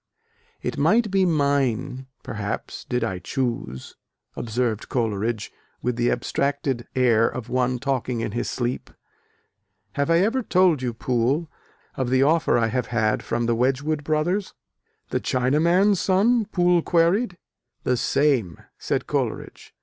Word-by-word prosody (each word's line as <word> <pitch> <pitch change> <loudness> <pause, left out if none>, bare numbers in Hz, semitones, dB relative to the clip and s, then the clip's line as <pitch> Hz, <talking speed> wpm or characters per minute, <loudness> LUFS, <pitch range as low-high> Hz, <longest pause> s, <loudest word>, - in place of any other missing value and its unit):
"It - - -3
might 225 -3 +3
be 195 -1 +3
mine, 135 -4 0 0.2
perhaps, - - -5
did 125 -1 -1
I 95 -1 -2
choose...." 115 - -4 0.4
observed 115 -1 -2
Coleridge, 110 -3 -1 0.3
with 125 -1 0
the 120 0 +1
abstracted 135 0 -1
air 120 -3 +4
of 125 -3 -7
one 125 0 +1
talking 130 -2 -2
in 115 - -2
his 120 - -2
sleep, 120 0 -3 1.0
"Have 140 +1 -1
I 165 - +5
ever 230 +7 +1
told 180 - +3
you, 125 -1 -1
Poole, 130 +7 0 0.4
of 130 -2 -2
the 130 +1 +3
offer 160 0 +3
I 115 -1 +2
have 125 +2 -1
had 110 -2 +1
from 120 0 -2
the 120 - +2
Wedgwood 135 +5 0
brothers?" 165 +6 -1 0.6
"The - - +1
china 130 +3 +1
man's 185 +4 +3
sons?" 210 +4 +2
Poole 175 -1 +3
queried. 175 +5 +2 0.5
"The 125 - +2
same," 130 - +1 0.2
said - - -1
Coleridge. - - -3
130 Hz, 140 wpm, -24 LUFS, 120-165 Hz, 1.0 s, I